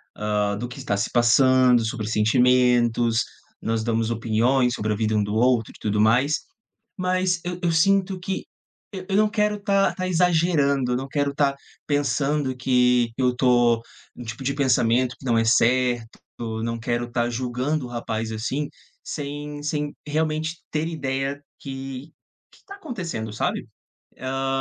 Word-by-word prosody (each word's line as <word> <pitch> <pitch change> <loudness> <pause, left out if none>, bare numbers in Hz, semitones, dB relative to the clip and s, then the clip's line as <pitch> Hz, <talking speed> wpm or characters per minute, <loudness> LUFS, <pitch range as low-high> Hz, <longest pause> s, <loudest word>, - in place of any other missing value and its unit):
hã, 105 -1 -1
do 120 +3 -4
que 125 - -10
está 100 - -1
se 100 +3 -1
passando, 125 0 +5
sobre 110 -1 -3
sentimentos, 120 0 +3 0.4
nós 115 0 -1
damos 115 0 0
opiniões 120 +3 +2
sobre 105 0 -1
a - - -1
vida 110 0 0
um 105 - +2
do 105 +1 -3
outro 120 -1 +2
e - - -16
tudo 105 -1 -1
mais. 125 +8 +3 0.6
Mas 185 -1 0
eu 180 0 -4
eu 170 - +1
sinto 190 +3 +2
que 190 +1 -3 0.5
eu 185 -2 -7
eu 195 - +1
não 215 0 +4
quero 210 -1 +1
tá 200 -1 +2
tá 185 -1 -3
exagerando, 160 -7 +2
eu 125 - +1
não 135 +2 -4
quero 140 0 0
tá 140 -1 +2 0.3
pensando 145 -1 0
que 125 -2 +2
eu 125 -1 +1
tô 120 -2 +3 0.3
num 120 - -9
tipo 115 +3 -7
de 140 - +1
pensamento 125 -2 +2
que - - -15
não 115 -3 +2
é 115 - +2
certo, 120 0 +2 0.2
eu 110 -1 -4
não 115 0 -2
quero 120 +1 -2
tá 120 0 0
julgando 125 +4 -2
o - - -8
rapaz, 115 -2 -3
assim, 130 +7 -2 0.4
sem 145 0 -5
sem 150 -1 -2
realmente 155 +2 -1
ter 155 +1 -1
ideia 135 -2 -3 0.2
que 135 +1 -7 0.4
que - - -22
tá 395 - -10
acontecendo, 180 - -5
sabe? 105 - -2 0.5
Hã, 135 +1 -3
130 Hz, 165 wpm, -24 LUFS, 115-150 Hz, 0.6 s, passando